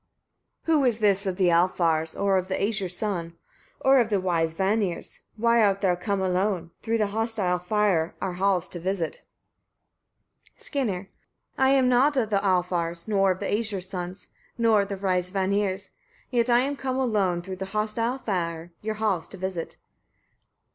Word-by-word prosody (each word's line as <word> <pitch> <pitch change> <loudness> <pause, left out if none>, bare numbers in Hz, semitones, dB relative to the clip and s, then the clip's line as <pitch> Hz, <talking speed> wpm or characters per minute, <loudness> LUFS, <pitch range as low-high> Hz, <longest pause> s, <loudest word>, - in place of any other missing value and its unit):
17. 320 -2 +3
Who - - +1
is 235 -3 +1
this 200 -2 +2
of 185 -1 -2
the 185 -3 +3
Alfar's, 170 -2 +2
or 195 -1 +2
of 185 - -5
the 190 - -1
Æsir's 195 -4 -1
sons, 175 -6 -3 0.5
or 270 0 +5
of 230 -3 +2
the 205 -3 +2
wise 165 -3 0
Vanir's? 195 -1 -1 0.2
Why 235 +1 +3
art 195 -1 +2
thou 190 -3 +3
come 200 +2 -2
alone, 185 -2 0
through 230 0 0
the 210 -2 +1
hostile 220 -5 0
fire, 190 -3 +1
our 190 -2 -2
halls 185 -1 +1
to 175 - -7
visit? 180 -2 -2 1.4
Skirnir. 225 -11 -2
18. - - -20 0.5
I 265 0 +4
am 270 -2 +4
not 265 +4 +3
of 220 -4 0
the 200 -1 +1
Alfar's, 175 -2 0
nor 195 -2 +3
of 185 - +1
the 205 - -4
Æsir's 205 -3 -1
sons, 180 0 -6 0.3
nor 225 -3 +4
of 200 - -4
the 200 - -3
wise 185 -2 0
Vanir's; 195 0 -1 0.4
yet 240 -1 +1
I 240 0 +5
am 280 +2 -1
come 265 -2 -3
alone, 200 -9 +1
through 190 0 -6
the 190 - -4
hostile 230 +4 0
fire, 170 -7 -3
your 220 0 -3
halls 210 -6 -1
to - - -10
visit. 185 -2 -4
195 Hz, 175 wpm, -26 LUFS, 180-220 Hz, 1.4 s, or